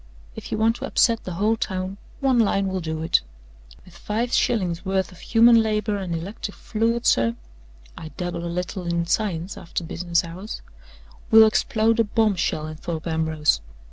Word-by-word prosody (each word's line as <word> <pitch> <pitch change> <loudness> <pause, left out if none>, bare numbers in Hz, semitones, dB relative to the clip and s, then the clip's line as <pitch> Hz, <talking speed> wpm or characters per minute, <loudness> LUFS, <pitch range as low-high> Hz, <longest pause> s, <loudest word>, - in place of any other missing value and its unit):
If - - -9
you - - -1
want 225 +2 +2
to 270 - -5
upset 230 -4 +2
the 185 - -4
whole 210 +5 +2
town, 190 -2 -3 0.2
one 265 -3 +3
line 195 -3 +2
will 190 0 -2
do 160 -2 -4
it. 165 - +3 0.6
With 180 - -17
five 230 +6 -2
shillings' 180 -8 +1
worth 190 0 -1
of 180 - -15
human 230 0 +5
labor 215 -1 0
and 185 -4 -3
electric 195 +4 -6
fluid, 230 +2 -1
sir 115 0 +3 0.6
(I 160 - -8
dabble 175 -2 -3
a - - -3
little 180 +1 -4
in 170 0 0
science 180 -2 -1
after 170 - -5
business 170 0 -1
hours), 180 +6 -7 0.7
we'll 220 0 +9
explode 220 +1 +2
a - - +6
bombshell 205 -8 0
in 155 0 -7
Thorpe 165 0 -5
Ambrose!" 160 - +1
190 Hz, 170 wpm, -23 LUFS, 170-220 Hz, 0.7 s, we'll